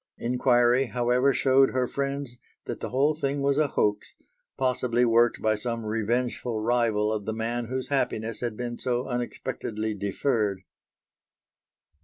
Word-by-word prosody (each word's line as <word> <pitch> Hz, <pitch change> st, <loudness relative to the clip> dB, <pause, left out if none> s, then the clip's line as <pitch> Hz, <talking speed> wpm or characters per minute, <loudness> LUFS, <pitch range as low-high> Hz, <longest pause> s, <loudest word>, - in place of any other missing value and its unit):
Inquiry, 125 Hz, +1 st, +3 dB
however, 125 Hz, +3 st, +2 dB
showed 135 Hz, 0 st, +4 dB
her 130 Hz, -1 st, 0 dB
friends 140 Hz, -2 st, -3 dB, 0.3 s
that -, -, -5 dB
the -, -, -4 dB
whole 140 Hz, +4 st, +2 dB
thing 140 Hz, -2 st, -2 dB
was 140 Hz, +1 st, +1 dB
a 155 Hz, -, +3 dB
hoax 105 Hz, -5 st, -1 dB, 0.4 s
possibly 125 Hz, -2 st, +1 dB
worked 115 Hz, 0 st, +3 dB
by 110 Hz, -, +3 dB
some 115 Hz, +1 st, -3 dB
revengeful 115 Hz, +1 st, -1 dB
rival 110 Hz, -2 st, +1 dB
of 105 Hz, -2 st, -4 dB
the 110 Hz, -, -2 dB
man 115 Hz, +1 st, -2 dB
whose 130 Hz, +1 st, -4 dB
happiness 115 Hz, -5 st, -1 dB
had 120 Hz, -3 st, -3 dB
been 120 Hz, -1 st, -4 dB
so 125 Hz, 0 st, -1 dB
unexpectedly 110 Hz, -3 st, -3 dB
deferred. 100 Hz, 0 st, -1 dB
120 Hz, 140 wpm, -26 LUFS, 110-130 Hz, 0.4 s, showed